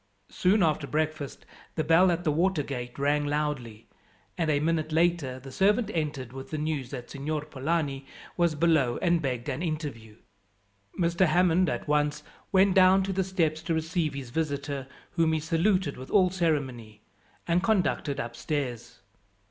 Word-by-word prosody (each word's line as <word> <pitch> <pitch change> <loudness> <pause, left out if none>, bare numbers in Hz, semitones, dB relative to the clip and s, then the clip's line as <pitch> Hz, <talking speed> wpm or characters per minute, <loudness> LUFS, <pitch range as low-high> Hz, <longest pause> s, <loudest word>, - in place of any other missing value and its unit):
Soon 190 +2 +3
after 155 -3 +1
breakfast 155 -2 -3 0.3
the 155 - 0
bell 165 +4 +5
at 175 0 0
the 155 - +2
water 170 0 +1
gate 125 -3 -6
rang 145 +1 +1
loudly, 145 -7 -3 0.5
and 160 - -1
a 145 -2 +2
minute 155 0 0
later 160 -5 +1
the 135 +1 -11
servant 205 - +2
entered 145 -6 -3
with 135 0 -8
the 155 - -3
news 150 -4 -2
that 125 -3 -7
Signor 150 +2 -3
Polani 140 -1 -2 0.3
was 170 -3 +2
below, 150 -6 +2
and 170 -1 +3
begged 125 -5 -3
an 140 +2 -3
interview. 145 -10 -4 0.8
Mr. 175 +1 +3
Hammond 175 +2 +3
at - - -4
once 150 0 +1 0.3
went 190 -1 +4
down 190 +1 +6
to 195 0 -2
the 190 +1 +1
steps 165 -4 0
to 165 0 -1
receive 160 -1 -1
his 130 -4 -7
visitor, 145 -2 -2 0.2
whom 165 -2 +2
he 160 - +1
saluted 165 +1 +1
with 130 +1 -9
all 185 -3 +4
ceremony, 130 - -2 0.4
and 175 +1 +2
conducted 180 -8 0
upstairs. 120 -2 -4
155 Hz, 160 wpm, -28 LUFS, 140-170 Hz, 0.8 s, down